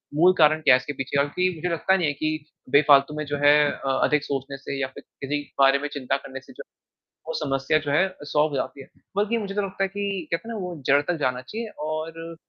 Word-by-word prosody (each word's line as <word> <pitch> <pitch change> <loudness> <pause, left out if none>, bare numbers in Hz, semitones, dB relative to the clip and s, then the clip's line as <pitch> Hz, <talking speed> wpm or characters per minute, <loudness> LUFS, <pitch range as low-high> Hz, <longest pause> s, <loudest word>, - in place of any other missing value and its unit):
मूल 180 +4 +6
कारण 155 0 +5
क्या 140 - +6
है - - +4
इसके 145 +3 -6
पीछे 135 +1 -3
और 140 - +1
कि 185 0 +3
मुझे 165 +3 -3
लगता 190 +3 +2
नहीं 170 -5 +1
है 145 - 0
कि 155 +1 -3 0.3
बेफ़ालतू 145 0 +5
में 150 - -3
जो 145 0 -3
है 145 - +8 0.2
अ, 135 - -5
अधिक 150 0 +2
सोचने 140 -1 -4
से 140 0 -6
या 130 - 0
फिर - - -10 0.2
किसी 145 +2 -2 0.2
बारे 135 0 +6
में 145 - -3
चिंता 135 -1 -1
करने 135 -1 -9
से 135 - -16
जो - - -10
है, - - -67 0.6
वो 160 - -3
समस्या 135 +2 +1
जो - - 0
है 185 +7 +3 0.2
सॉल्व 150 +1 +2
हो 145 - -5
जाती 135 0 -3
है, - - -13 0.3
बल्कि 215 +3 +1
मुझे 200 -2 -4
तो 205 - +1
लगता 195 0 -3
है 195 - +2
कि 200 -3 -3
कहते 165 +7 -2
हैं 230 - -4
ना 215 - -4
वो 180 -1 -5
जड़ 140 +1 +5
तक 175 +4 -2
जाना 125 -3 -1
चाहिए 220 - -6 0.2
और 165 +1 -5
150 Hz, 260 wpm, -24 LUFS, 140-180 Hz, 0.6 s, है